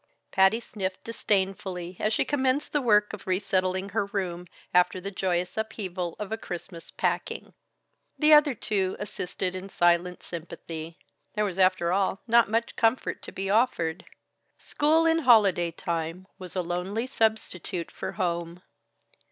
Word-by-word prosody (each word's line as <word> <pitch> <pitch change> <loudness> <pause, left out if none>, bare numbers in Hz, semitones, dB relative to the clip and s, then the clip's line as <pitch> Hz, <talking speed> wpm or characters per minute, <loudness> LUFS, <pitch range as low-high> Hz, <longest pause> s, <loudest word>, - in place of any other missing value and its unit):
Patty 190 +4 +4
sniffed 190 -5 -5
disdainfully 190 -5 -1
as 215 - +1
she - - +1
commenced 270 0 0
the 295 - +2
work 210 -4 +3
of 205 -2 -9
resettling 185 0 0
her 200 -1 -1
room, 180 -3 -3 0.3
after 180 +1 +4
the 195 +2 -5
joyous 180 -1 -1
upheaval 185 -5 -3
of 210 -1 -6
a 220 - -2
Christmas 175 -2 -7
packing. - - -2 0.6
The 305 0 +5
other 295 -3 +6
two 195 -3 -1
assisted 185 -2 -3
in 185 +1 -6
silent 175 0 +2
sympathy. 165 -1 -7 0.4
There 210 0 +1
was 195 -2 -4
after 185 -2 +3
all 195 0 +1
not 235 -2 +5
much 230 +2 0
comfort 225 +2 +1
to - - -9
be 195 0 -3
offered. 185 -7 +1 0.5
School 315 +3 +2
in 325 0 +4
holiday 205 - +5
time 165 +2 -4
was 185 -1 -9
a 185 - 0
lonely 180 +7 -2
substitute 220 -8 -1
for - - -5
home. 170 0 -2
190 Hz, 145 wpm, -27 LUFS, 180-220 Hz, 0.6 s, other